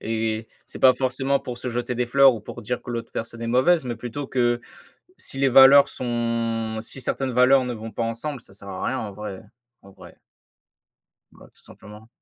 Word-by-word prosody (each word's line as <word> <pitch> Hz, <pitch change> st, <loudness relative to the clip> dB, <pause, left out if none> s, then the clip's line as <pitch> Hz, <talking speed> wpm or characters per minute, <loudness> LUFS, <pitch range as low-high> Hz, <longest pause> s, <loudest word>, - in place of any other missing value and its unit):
Et 110 Hz, 0 st, -2 dB, 0.2 s
c'est -, -, -9 dB
pas 130 Hz, -1 st, +6 dB
forcément 135 Hz, +2 st, 0 dB
pour 125 Hz, -3 st, -7 dB
se 125 Hz, -, -4 dB
jeter 120 Hz, +1 st, -3 dB
des 125 Hz, 0 st, 0 dB
fleurs 135 Hz, +1 st, +6 dB
ou 110 Hz, -, -7 dB
pour -, -, -10 dB
dire 125 Hz, +3 st, -3 dB
que -, -, -9 dB
l'autre 115 Hz, -1 st, -5 dB
personne 115 Hz, +1 st, -6 dB
est -, -, -3 dB
mauvaise 130 Hz, +6 st, +3 dB
mais 120 Hz, -2 st, -4 dB
plutôt 125 Hz, +4 st, -6 dB
que 120 Hz, -2 st, 0 dB, 0.6 s
si 135 Hz, -, -4 dB
les 135 Hz, 0 st, +3 dB
valeurs 135 Hz, +2 st, +8 dB
sont 115 Hz, -2 st, -2 dB
si 115 Hz, +4 st, 0 dB
certaines 130 Hz, +1 st, -2 dB
valeurs 130 Hz, +2 st, +4 dB
ne 125 Hz, -1 st, -4 dB
vont 110 Hz, 0 st, -8 dB
pas 115 Hz, -, -2 dB
ensemble, 120 Hz, +4 st, -4 dB
ça 95 Hz, -, -12 dB
sert 100 Hz, 0 st, -10 dB
à 95 Hz, -, -6 dB
rien 130 Hz, -, -1 dB
en 105 Hz, -4 st, -5 dB
vrai. 105 Hz, -1 st, -8 dB, 0.4 s
En 100 Hz, -, -16 dB
vrai. -, -, -16 dB, 1.1 s
Bah, -, -, -17 dB
tout -, -, -22 dB
simplement. 105 Hz, +2 st, -14 dB
120 Hz, 205 wpm, -23 LUFS, 115-130 Hz, 1.1 s, valeurs